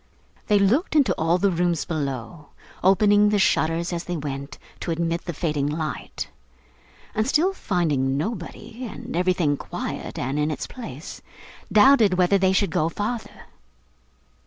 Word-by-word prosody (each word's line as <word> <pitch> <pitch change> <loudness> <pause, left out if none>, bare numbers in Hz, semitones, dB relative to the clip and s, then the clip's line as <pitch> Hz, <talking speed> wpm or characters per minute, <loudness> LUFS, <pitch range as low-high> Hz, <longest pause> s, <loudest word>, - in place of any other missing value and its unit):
They 210 - +4
looked 235 - +2
into 265 -11 +4
all 165 +2 +1
the 195 +2 +2
rooms 175 -2 0
below: 145 -1 -4 0.4
opening 205 +2 +5
the 210 - +2
shutters 170 -2 +1
as 170 0 -3
they 175 -1 -3
went, 140 -1 -5 0.2
to - - -5
admit 165 +1 -1
the 175 - -2
fading 150 -3 -1
light: 155 0 -4 0.9
and 215 +2 0
still 340 +8 +2
finding 150 - 0
nobody, 220 - -5
and 210 - -7
everything 175 -5 +1
quiet - - -5
and 135 +4 -2
in 150 +1 +1
its 155 - -3
place, 160 - -9 0.5
doubted 215 -3 +6
whether 185 +2 +3
they 190 0 +3
should 190 -1 +1
go 155 +1 +1
farther. 220 +6 -5
175 Hz, 145 wpm, -24 LUFS, 155-205 Hz, 0.9 s, doubted